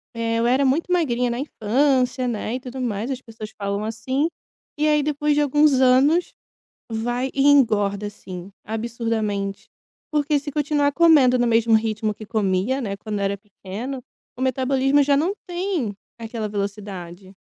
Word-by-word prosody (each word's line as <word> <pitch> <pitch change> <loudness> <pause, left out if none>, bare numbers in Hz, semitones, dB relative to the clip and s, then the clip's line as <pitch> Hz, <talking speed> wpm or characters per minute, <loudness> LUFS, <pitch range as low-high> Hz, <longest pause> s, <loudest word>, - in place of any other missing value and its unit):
eh, 230 0 -1
eu 235 - +2
era 265 +3 +3
muito 310 +7 +1
magrinha 250 -9 +1
na 235 - -2
infância." 255 0 +1
Né, 230 0 -2
e - - -3
tudo 255 +1 -7
mais 230 +2 -2
as 260 0 -4
pessoas 220 -2 -9
falam, 200 0 -3
assim, 260 +7 -1 0.5
e 305 - +3
aí 300 -1 +3
depois 295 0 0
de 295 - +3
alguns 295 +1 +4
anos 270 +7 +4 0.6
vai 240 +3 -2
e 275 - +1
engorda, 210 -7 +3
assim, 185 -2 -9
absurdamente 220 -3 -3 0.4
porque 295 0 +1
se 290 +1 -6
continuar 290 0 +1
comendo 290 -6 +5
no 245 - +2
mesmo 230 -1 +3
ritmo 220 -1 0
que 215 - -10
comia, 210 +4 0
né, 200 -4 -3
quando 210 -1 -4
era 200 0 0
pequeno 210 +6 -7 0.4
o - - -7
metabolismo 265 +2 +2
já 280 0 +3
não 360 +7 0
tem 350 - -2 0.3
aquela 225 -1 -4
velocidade. 200 -2 -6
240 Hz, 160 wpm, -22 LUFS, 210-280 Hz, 0.6 s, comendo